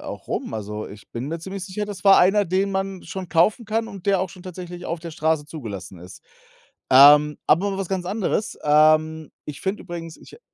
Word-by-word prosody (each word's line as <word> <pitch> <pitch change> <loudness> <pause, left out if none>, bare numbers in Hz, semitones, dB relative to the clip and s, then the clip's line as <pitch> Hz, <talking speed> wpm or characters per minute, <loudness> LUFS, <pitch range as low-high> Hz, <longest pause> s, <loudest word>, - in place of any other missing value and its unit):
äh, - - -13
auch - - -8
rum. - - -4
Also, 105 0 -5
ich 100 +1 -14
bin 125 +4 -5
mir 165 +1 -4
ziemlich 190 +2 -6
sicher, 200 +3 -4
das 205 -3 -8
war 195 -1 +7
einer, 200 +3 +4
den 190 +3 0
man 195 -1 -3
schon 190 -2 -7
kaufen 190 +9 +2
kann 225 +1 -1
und 200 -4 -11
der 195 -2 +3
auch 190 - -2
schon 180 +1 -14
tatsächlich 180 -1 -8
auf 170 - -3
der 165 0 -8
Straße 155 -2 0
zugelassen 100 - -8
ist. 90 +2 -13 0.7
Ähm, 145 +2 +7
aber 180 +7 +3
mal 195 - -4
was 195 -3 -3
ganz 185 -2 -3
anderes. 205 +1 -2
Ähm, 155 +1 +3
ich 145 -2 -8
finde 195 +2 -3
übrigens, 165 -2 -7
ich, - - -17
äh - - -17
175 Hz, 220 wpm, -23 LUFS, 150-195 Hz, 0.7 s, war